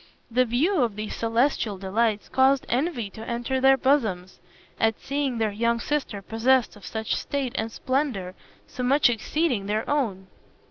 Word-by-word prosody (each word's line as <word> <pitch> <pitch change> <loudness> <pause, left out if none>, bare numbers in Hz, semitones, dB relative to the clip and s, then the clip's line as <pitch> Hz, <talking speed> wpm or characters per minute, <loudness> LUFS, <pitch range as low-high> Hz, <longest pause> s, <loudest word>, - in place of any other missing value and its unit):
The 255 +2 +3
view 290 - +1
of 230 -4 0
these 215 0 -5
celestial 230 -2 0
delights 205 +3 0
caused 265 +1 +3
envy 245 - -1
to 220 +3 -9
enter 240 +2 -1
their 270 0 +6
bosoms, 220 -10 0 0.4
at 225 -1 +1
seeing 275 -3 -2
their 220 -2 0
young 235 +3 0
sister 250 -8 -2
possessed 240 +4 +2
of 205 - -12
such 220 -1 -2
state 275 -4 -2
and 225 -2 -2
splendor, 255 -9 -2 0.3
so - - -7
much 260 +1 +4
exceeding 240 -2 -1
their 215 +2 -1
own. 225 -10 -1
235 Hz, 155 wpm, -25 LUFS, 215-270 Hz, 0.4 s, their